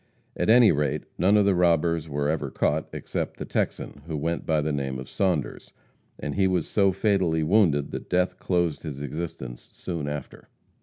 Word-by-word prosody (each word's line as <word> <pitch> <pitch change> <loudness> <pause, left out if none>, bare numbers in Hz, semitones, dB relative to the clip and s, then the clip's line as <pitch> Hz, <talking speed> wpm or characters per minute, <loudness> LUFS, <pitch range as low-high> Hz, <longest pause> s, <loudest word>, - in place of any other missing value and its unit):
At - - -1
any 120 -1 +7
rate, 75 -1 0 0.2
none 100 +4 +4
of 105 - +4
the 100 - +4
robbers 85 -2 +2
were 70 0 -1
ever 80 +1 -1
caught, 75 +2 0
except - - -4
the - - -5
Texan, 70 - -3
who 80 -2 -3
went 85 +3 -2
by 80 -1 +2
the 75 +1 -1
name 65 -2 -2
of 65 0 -7
Saunders, 90 -7 -2 0.4
and 75 - -4
he 95 -1 +2
was 90 -4 0
so 100 -2 +3
fatally 95 -6 +1
wounded 80 -5 +3
that - - -6
death 90 0 +1
closed 85 -4 0
his 75 -4 -6
existence 70 -4 -6
soon 85 -5 -5
after. 75 -2 -7
80 Hz, 185 wpm, -26 LUFS, 75-90 Hz, 0.4 s, any